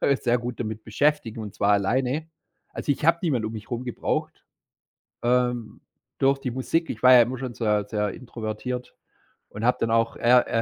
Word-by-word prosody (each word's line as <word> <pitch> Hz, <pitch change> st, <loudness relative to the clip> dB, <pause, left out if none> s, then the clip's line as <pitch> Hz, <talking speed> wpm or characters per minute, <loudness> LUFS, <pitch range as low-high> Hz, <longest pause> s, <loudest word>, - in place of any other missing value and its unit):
äh, 140 Hz, -, +3 dB
sehr 120 Hz, -2 st, +1 dB
gut 120 Hz, 0 st, -5 dB
damit 110 Hz, -1 st, -4 dB
beschäftigen 120 Hz, -1 st, 0 dB
und 105 Hz, -2 st, -7 dB
zwar 100 Hz, -, +1 dB
alleine. 130 Hz, +10 st, 0 dB, 0.4 s
Also, -, -, -3 dB
ich 145 Hz, -, -1 dB
habe 165 Hz, +1 st, +5 dB
niemand 135 Hz, -10 st, 0 dB
um 110 Hz, -, -3 dB
mich 110 Hz, -2 st, -9 dB
rum 120 Hz, 0 st, -3 dB
gebraucht. 120 Hz, -, -3 dB, 0.8 s
Ähm, 125 Hz, -2 st, 0 dB, 0.3 s
durch 135 Hz, +1 st, +2 dB
die 135 Hz, -2 st, -4 dB
Musik 145 Hz, +7 st, -1 dB
ich 115 Hz, -, -6 dB
war 130 Hz, -, +8 dB
ja 125 Hz, -, +9 dB
immer 125 Hz, +3 st, -2 dB
schon 130 Hz, -1 st, -5 dB
sehr 105 Hz, -3 st, 0 dB
sehr 105 Hz, -1 st, -1 dB
introvertiert 125 Hz, +1 st, -6 dB, 0.5 s
und 105 Hz, -, -8 dB
habe 125 Hz, +2 st, +3 dB
dann 115 Hz, -, 0 dB
auch 115 Hz, 0 st, +1 dB
er 120 Hz, +1 st, +4 dB
120 Hz, 185 wpm, -25 LUFS, 110-130 Hz, 0.8 s, ja